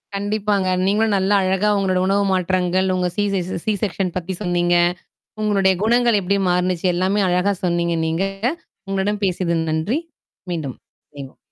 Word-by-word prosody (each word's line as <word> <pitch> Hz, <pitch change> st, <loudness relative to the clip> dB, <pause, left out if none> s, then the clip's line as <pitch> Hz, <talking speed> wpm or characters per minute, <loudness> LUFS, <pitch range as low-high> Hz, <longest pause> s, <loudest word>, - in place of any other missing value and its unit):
கண்டிப்பாங்க. 205 Hz, -1 st, 0 dB, 0.2 s
நீங்களும் 210 Hz, +1 st, +2 dB
நல்லா 195 Hz, +2 st, +2 dB
அழகா 190 Hz, +2 st, +1 dB
உங்களோட 185 Hz, -2 st, +1 dB
உணவு 200 Hz, +1 st, +2 dB
மாற்றங்கள், 185 Hz, 0 st, +1 dB
உங்க 180 Hz, -1 st, 0 dB
சி 205 Hz, -, +2 dB
செ 195 Hz, -, +1 dB
ச -, -, -3 dB
சி 215 Hz, -, +1 dB
செக்ஷன் 185 Hz, -2 st, -1 dB
பத்தி 185 Hz, +1 st, -4 dB
சொன்னீங்க. 175 Hz, -2 st, +1 dB, 0.7 s
உங்களுடைய 200 Hz, -3 st, +3 dB
குணங்கள் 235 Hz, -1 st, +3 dB
எப்படி 200 Hz, +2 st, 0 dB
மாறுனுச்சு, 180 Hz, 0 st, 0 dB
எல்லாமே 190 Hz, +3 st, +1 dB
அழகா 180 Hz, +3 st, +2 dB
சொன்னீங்க 170 Hz, -1 st, 0 dB
நீங்க. 165 Hz, +3 st, 0 dB, 0.7 s
உங்களுடன் 200 Hz, +2 st, -1 dB
பேசியது 175 Hz, -2 st, 0 dB
நன்றி. 170 Hz, -, 0 dB, 0.5 s
மீண்டும். 155 Hz, -7 st, -4 dB, 0.4 s
இணைவோம் 140 Hz, -2 st, -10 dB
190 Hz, 145 wpm, -20 LUFS, 175-205 Hz, 0.7 s, உங்களுடைய